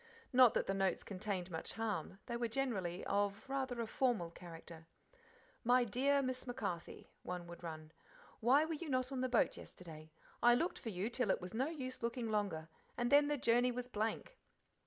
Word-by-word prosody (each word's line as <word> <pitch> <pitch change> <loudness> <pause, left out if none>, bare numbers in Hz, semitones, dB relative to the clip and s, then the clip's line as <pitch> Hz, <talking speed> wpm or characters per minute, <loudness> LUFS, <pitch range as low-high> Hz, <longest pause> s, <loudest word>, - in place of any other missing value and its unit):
Not 250 -2 +7
that - - +2
the 195 - 0
notes 195 -2 +1
contained 185 -2 -3
much 160 - -4
harm, 220 -3 -2
they 235 - -3
were 235 0 0
generally 215 -8 -1
of 200 +3 0
rather 265 -3 -2
a 230 - 0
formal 220 -8 0
character. 165 -1 -11 0.8
"My 245 +1 +5
dear' 275 +5 +2
Miss 255 0 -3
MacCarthy," 195 -8 -4
one 180 -1 -5
would 170 0 -10
run 155 -2 -7 0.5
"Why 265 +7 +5
were 325 - -2
you 315 +1 -5
not 255 0 0
on 260 -2 -2
the 255 - 0
boat 240 - +3
yesterday? 160 -3 -11 0.3
I 240 0 +7
looked 345 +8 0
for 230 - -5
you 200 +3 -2
till 245 -3 0
it - - +3
was 180 0 -7
no 255 +5 +1
use 265 -5 -5
looking 235 -1 -2
longer, 195 -7 -1 0.3
and 240 0 0
then 290 0 +7
the 295 0 +1
journey 245 0 +3
was 245 0 -4
blank. 225 - -3
230 Hz, 190 wpm, -37 LUFS, 185-255 Hz, 0.8 s, Not